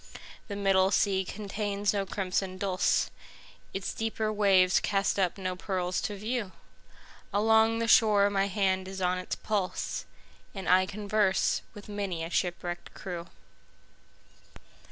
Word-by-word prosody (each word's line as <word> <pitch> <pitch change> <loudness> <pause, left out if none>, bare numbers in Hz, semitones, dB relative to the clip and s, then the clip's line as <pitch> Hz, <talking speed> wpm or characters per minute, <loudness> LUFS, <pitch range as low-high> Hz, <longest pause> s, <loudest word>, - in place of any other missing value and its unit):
The 200 - -5
middle 195 -1 +3
sea 195 -1 +2
contains 205 +1 -2
no 200 -1 -1
crimson 185 -1 -2
dulse, 185 -1 +1 0.6
Its 195 0 -4
deeper 220 -1 -2
waves 190 -3 +4
cast 200 0 0
up 185 -1 +1
no 185 -1 -3
pearls 180 -1 -2
to 205 - -3
view; 215 -1 -3 0.8
Along 220 +2 +4
the 230 0 -1
shore 210 -3 +6
my 195 0 +1
hand 190 -2 0
is 190 0 -6
on 180 0 +1
its 185 - -4
pulse, 200 -4 -2 0.5
And 190 -1 -6
I 185 +1 +5
converse 205 -1 +1
with 205 - -10
many 200 -5 -3
a 165 - -5
shipwrecked 175 -1 -3
crew. 175 -2 -6
195 Hz, 135 wpm, -29 LUFS, 185-205 Hz, 0.8 s, shore